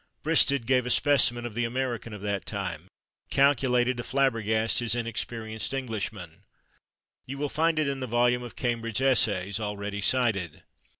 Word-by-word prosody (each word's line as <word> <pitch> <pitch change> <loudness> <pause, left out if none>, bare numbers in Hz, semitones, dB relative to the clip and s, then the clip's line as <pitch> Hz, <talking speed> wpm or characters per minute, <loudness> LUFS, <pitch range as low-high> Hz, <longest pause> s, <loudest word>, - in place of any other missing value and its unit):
Bristed 140 -5 +3
gave 125 -1 +2
a - - -2
specimen 120 -3 +3
of 120 - -6
the 120 +2 -1
American 120 -1 -3
of 105 -2 -8
that 100 -1 -3
time, 90 -5 -5 0.4
calculated 130 -3 +2
to 120 - -4
flabbergast 115 -5 +1
his 120 -2 +1
inexperienced 115 0 -3
Englishman; 100 -8 -5 0.9
you 135 +2 -6
will 145 +1 -2
find 160 +2 +1
it 155 -2 +1
in 140 -1 -2
the 130 - -4
volume 120 +1 +2
of 120 -1 -9
Cambridge 115 -2 -2
Essays, 105 -7 +2
already 105 -1 -4
cited. 105 - 0
120 Hz, 155 wpm, -27 LUFS, 105-130 Hz, 0.9 s, Bristed